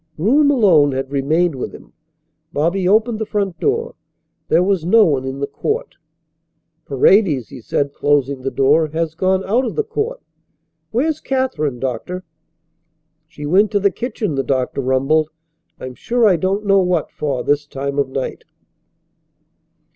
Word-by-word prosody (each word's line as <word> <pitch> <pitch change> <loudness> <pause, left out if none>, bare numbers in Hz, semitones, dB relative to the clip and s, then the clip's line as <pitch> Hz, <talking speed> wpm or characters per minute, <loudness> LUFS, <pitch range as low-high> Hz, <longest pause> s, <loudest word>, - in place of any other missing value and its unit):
Groom 270 - +3
alone 180 - +4
had 135 +1 -4
remained 155 +5 +1
with 130 - -6
him. - - -16 0.6
Bobby 170 +5 0
opened 220 +3 +2
the 220 - -2
front 200 -4 -2
door. 460 +3 -1 0.5
There 175 - +3
was 190 -3 0
no 215 +5 +5
one 135 -5 0
in 130 +1 -4
the - - +1
court. 455 - -3 0.9
"Paredes," 145 - +3
he 125 - -10
said, 140 +5 -2
closing 140 -2 0
the 135 - -2
door, 145 +4 +3
"has 160 +1 -3
gone 185 +3 0
out 230 +7 +1
of 245 - -4
the 445 - +1
court. 455 +3 -3 0.7
Where's 300 +7 0
Katherine, 205 - -2
Doctor?" 135 +9 -4 1.0
"She 150 -2 -9
went 195 +7 +3
to 205 - +3
the 200 0 +2
kitchen," 225 - -3
the 135 - 0
doctor 130 0 -1
rumbled. 135 +4 +1 0.5
"I'm 130 0 -7
sure 235 - +1
I 190 - +4
don't 190 +5 -1
know 195 -1 +4
what 180 -4 0
for 140 -4 -3
this 145 0 0
time 140 0 -4
of 140 -2 0
night." 130 0 -4
165 Hz, 155 wpm, -18 LUFS, 140-210 Hz, 1.0 s, no